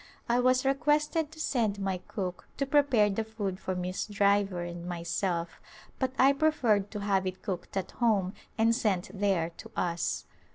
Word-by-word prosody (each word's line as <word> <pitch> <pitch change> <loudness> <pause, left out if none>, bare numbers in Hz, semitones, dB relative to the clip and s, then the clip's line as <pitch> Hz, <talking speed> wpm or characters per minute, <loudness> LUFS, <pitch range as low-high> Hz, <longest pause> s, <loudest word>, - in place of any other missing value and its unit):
I 240 +1 +3
was 255 +1 +3
requested 300 +3 +2
to 315 - -13
send 230 -9 0
my 195 -2 -2
cook 185 -1 -5
to 275 - 0
prepare 270 -7 +4
the 220 +3 -1
food 205 -4 -4
for 185 - -3
Miss 180 +2 -3
Driver 200 -3 +2
and 175 0 -6
myself 170 0 -2 0.4
but 260 -1 0
I 270 +2 +6
preferred 245 -10 +2
to 210 -1 -5
have 195 -2 +1
it 185 0 -5
cooked 195 -1 -4
at 190 - -2
home 205 -6 +1 0.2
and 225 +1 +4
sent 195 -6 0
there 190 -5 +1
to 225 - -10
us. 170 -1 -1
205 Hz, 170 wpm, -29 LUFS, 185-245 Hz, 0.4 s, I